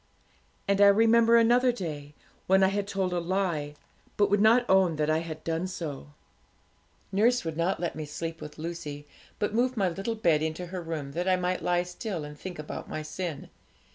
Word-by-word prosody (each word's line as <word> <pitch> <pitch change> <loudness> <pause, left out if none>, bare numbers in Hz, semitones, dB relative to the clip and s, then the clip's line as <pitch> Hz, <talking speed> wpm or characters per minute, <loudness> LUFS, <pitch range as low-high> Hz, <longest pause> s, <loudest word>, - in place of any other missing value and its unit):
'And 200 0 +2
I 200 - +9
remember 230 +3 +5
another 245 +2 +4
day, 150 -9 -6 0.3
when 190 +1 +5
I 190 - +5
had 200 0 -2
told 190 -2 -1
a 175 - 0
lie, 170 -5 -1 0.4
but 205 -1 +3
would 205 0 +3
not 235 +3 +5
own 190 -3 +4
that 155 0 0
I 155 - +2
had 160 -1 -7
done 165 +2 -2
so. 160 -7 -6 1.0
Nurse 230 +3 +2
would 160 -1 -3
not 170 +4 0
let 175 - -3
me 155 -1 -5
sleep 165 +2 -5
with 150 0 -9
Lucy, 155 -3 -6 0.3
but 205 0 -1
moved 250 +2 +1
my 195 -3 +2
little 195 +6 -3
bed 170 -9 +2
into 160 +3 -3
her 180 +1 -6
room, 160 -4 -5
that 175 +5 -3
I 185 - +4
might 180 0 -1
lie 175 0 +1
still 180 -1 -5
and 150 0 -9
think 180 +4 -8
about 150 0 -7
my 155 - -4
sin. 155 -1 -5
180 Hz, 200 wpm, -28 LUFS, 155-200 Hz, 1.0 s, I